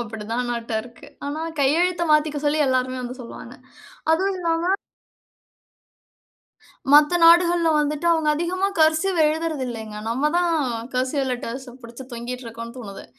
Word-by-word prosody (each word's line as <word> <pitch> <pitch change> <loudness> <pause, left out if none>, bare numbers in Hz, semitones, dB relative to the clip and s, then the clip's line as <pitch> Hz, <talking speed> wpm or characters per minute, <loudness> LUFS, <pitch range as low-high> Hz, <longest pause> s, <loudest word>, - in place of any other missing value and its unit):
அப்படிதானட்டருக்கு. 230 +1 -4 0.2
ஆனா 290 +2 -4 0.2
கையெழுத்தை 340 +5 +2
மாத்திக்க 300 -1 +2
சொல்லி 300 +1 +2
எல்லாருமே 255 0 0
வந்து 250 +1 -7
சொல்லுவாங்க. 235 - -10 0.6
அதுவும் 380 +4 0
இல்லாம 340 +2 +1 2.2
மத்த 300 +4 +6
நாடுகள்ல 340 0 +6
வந்துட்டு 300 +2 -1
அவுங்க 320 -2 +1
அதிகமா 355 +5 -1
கர்சிவ் 320 +3 +3
எழுதறதில்லைங்க. 265 -9 -3
நம்ம 270 +6 0
தான் 350 -1 +2 0.4
கர்சிவ் 260 +2 0
லெட்டர்ஸ 250 +1 -5
பிடிச்சு 235 +3 -10
தொங்கிட்ருக்கோம்னு 235 -1 -7
தோணுது. 200 -5 -9
285 Hz, 110 wpm, -23 LUFS, 240-330 Hz, 2.2 s, மத்த